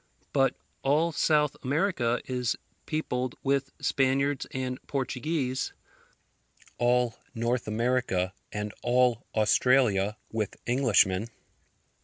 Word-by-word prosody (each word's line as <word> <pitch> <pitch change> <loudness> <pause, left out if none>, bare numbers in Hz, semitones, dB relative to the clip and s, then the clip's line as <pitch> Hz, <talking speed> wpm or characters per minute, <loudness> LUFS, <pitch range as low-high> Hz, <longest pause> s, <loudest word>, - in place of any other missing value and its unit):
But 135 -1 +3 0.3
all 155 +5 +2
South 150 -2 +2
America 135 -5 +1
is 125 -2 -1 0.3
peopled 130 -5 -2
with 135 0 +1
Spaniards 135 +1 +1
and 130 0 -3
Portuguese; 135 0 -2 1.1
all 120 -1 +2 0.2
North 120 +1 -1
America, 110 -5 0 0.2
and 105 0 -4
all 125 -1 +2
Australia 110 -2 +3
with 110 -3 -2
Englishmen. 115 -5 +3
125 Hz, 90 wpm, -28 LUFS, 115-135 Hz, 1.1 s, But